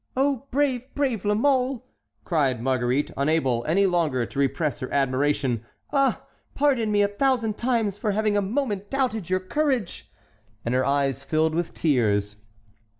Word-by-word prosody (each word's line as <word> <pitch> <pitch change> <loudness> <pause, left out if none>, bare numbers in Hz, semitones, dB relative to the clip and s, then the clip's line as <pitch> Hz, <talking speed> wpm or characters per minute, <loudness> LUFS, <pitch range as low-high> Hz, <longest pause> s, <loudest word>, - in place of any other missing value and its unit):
"Oh, 275 -1 +1
brave, 265 -2 0
brave 255 -8 -1
La 210 0 +2
Mole!" 255 0 +1 0.4
cried 140 - +1
Marguerite, 130 +2 0
unable 140 -5 +1
any 195 +6 +3
longer 160 -9 +1
to 140 - -6
repress 140 +1 0
her 130 - -5
admiration. 135 -3 +1 0.3
"Ah! 275 -2 +1 0.3
pardon 260 -7 +2
me 205 0 +3
a - - +3
thousand 230 0 0
times 225 -5 0
for 215 - -1
having 210 0 +1
a 205 - +3
moment 205 -2 -2
doubted 245 -9 -1
your 185 0 +2
courage." 255 - -2 0.5
And 120 - -1
her 130 +1 +2
eyes 140 -2 0
filled 155 0 +1
with 170 +1 -2
tears. 105 -8 +1
190 Hz, 150 wpm, -25 LUFS, -, 0.5 s, any